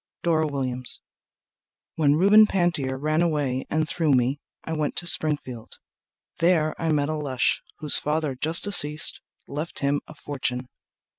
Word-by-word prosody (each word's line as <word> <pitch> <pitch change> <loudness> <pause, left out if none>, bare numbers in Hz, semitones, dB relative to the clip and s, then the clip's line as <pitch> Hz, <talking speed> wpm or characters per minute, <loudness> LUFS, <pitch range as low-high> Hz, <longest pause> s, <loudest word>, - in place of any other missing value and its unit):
Dora 160 -2 +1
Williams 130 -3 -1 0.9
When 145 -2 +2
Reuben 205 +6 +5
Pantier 165 -9 -1
ran 155 +3 -1
away 145 -6 -1
and 155 0 -1
threw 155 -4 0
me 130 +3 +1 0.2
I 160 - -5
went 155 -2 -2
to 175 - -3
Springfield. 145 -8 +4 0.6
There 165 -2 +2
I 165 -1 0
met 145 -2 0
a - - -2
lush, 140 -5 -1 0.2
Whose 150 -2 +1
father 150 -1 -2
just 155 +6 +2
deceased 155 -7 -1 0.2
left 150 +4 -6
him 140 +1 0
a 155 - -13
fortune. 130 -4 -4
150 Hz, 145 wpm, -24 LUFS, 140-160 Hz, 0.9 s, Reuben